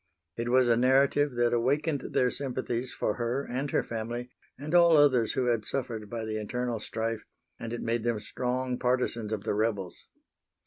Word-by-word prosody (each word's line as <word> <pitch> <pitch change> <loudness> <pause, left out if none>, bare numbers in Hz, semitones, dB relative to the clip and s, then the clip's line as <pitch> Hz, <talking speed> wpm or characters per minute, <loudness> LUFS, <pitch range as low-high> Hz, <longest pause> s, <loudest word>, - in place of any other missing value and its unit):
It 115 +1 -3
was 130 0 +4
a 120 - +5
narrative 135 +2 +3
that 120 0 +2
awakened 140 +5 0
their 125 -1 +3
sympathies 130 -2 -3
for 105 - -2
her 120 +3 -1
and 135 +4 -2
her - - +1
family 120 +2 -5 0.3
and 150 +4 -6
all 170 -2 +7
others 130 -6 +4
who 130 - 0
had 120 -3 +1
suffered 115 -3 -3
by 115 0 -4
the 110 0 -3
internal 120 +2 -2
strife, 110 +1 -3 0.4
and 115 - -5
it 120 - -4
made 115 0 -1
them 120 -2 0
strong 125 +3 -2
partisans 125 -3 0
of 105 -2 -2
the 110 - -1
rebels. 105 -4 -2
120 Hz, 180 wpm, -29 LUFS, 115-130 Hz, 0.4 s, all